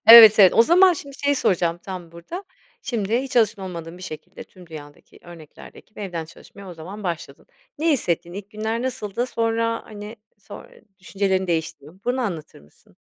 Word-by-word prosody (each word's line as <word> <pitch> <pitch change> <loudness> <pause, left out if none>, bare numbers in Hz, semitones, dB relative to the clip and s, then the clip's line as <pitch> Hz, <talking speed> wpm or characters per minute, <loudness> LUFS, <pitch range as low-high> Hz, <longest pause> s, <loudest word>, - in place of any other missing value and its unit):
Evet, 225 -2 +11
evet, 190 -3 +8
o 230 - +7
zaman 360 +7 +6
şimdi 280 -4 -8
şeyi 285 0 +3
soracağım 170 -6 +1
tam 175 -2 -8
burada. 255 - -8 0.4
Şimdi 230 -3 -1
hiç 270 -1 -6
alışkın 220 -3 +3
olmadığın 170 -2 -7
bir - - -12
şekilde, 180 +1 -9
tüm 180 -2 -17
dünyadaki 145 -3 -12
örneklerdeki 165 -3 -14
gibi 215 - -13
evden 175 -5 -4
çalışmaya 190 +4 -14
o 180 - -8
zaman 185 +6 -9
başladın. 170 -5 -5 0.3
Ne 325 +2 +2
hissettin, 175 - -1
ilk 200 +2 -8
günler 220 +2 -3
nasıldı? 245 -3 -3
Sonra, 230 -1 -1
hani, 210 +1 -9 0.2
sonr 205 - -11 0.3
düşüncelerin 190 0 -1
değişti 160 -4 -2
mi, 170 +5 -16
bunu 250 +1 0
anlatır 175 -10 -5
mısın? 75 +1 -25
195 Hz, 175 wpm, -23 LUFS, 170-230 Hz, 0.4 s, Evet